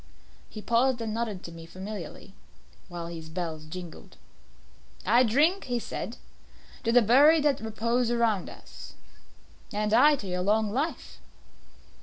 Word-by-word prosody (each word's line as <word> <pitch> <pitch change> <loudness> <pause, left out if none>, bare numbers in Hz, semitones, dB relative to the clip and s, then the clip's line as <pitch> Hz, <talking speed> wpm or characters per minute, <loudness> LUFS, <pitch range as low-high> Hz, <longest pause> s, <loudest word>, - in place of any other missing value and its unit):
He 215 - -9
paused 240 +2 +2
and 225 -2 -3
nodded 220 -5 -3
to 170 - -8
me 165 0 -11
familiarly, 190 +1 -8 0.5
while 175 -2 -6
his 165 -1 -8
bells 160 -2 -5
jingled. 170 +1 -10 0.9
"I 240 - +5
drink," 295 - +2
he 245 -1 -1
said, 235 0 -5 0.7
"to 230 - +1
the 245 0 +6
buried 290 +8 +6
that 290 -3 +2
repose 230 +2 -1
around 230 -5 +1
us." - - -12 0.8
"And 210 +1 -1
I 290 +6 +6
to 235 - -8
your 180 -1 -2
long 210 +2 +1
life." 290 +9 -3
220 Hz, 140 wpm, -27 LUFS, 185-245 Hz, 0.9 s, the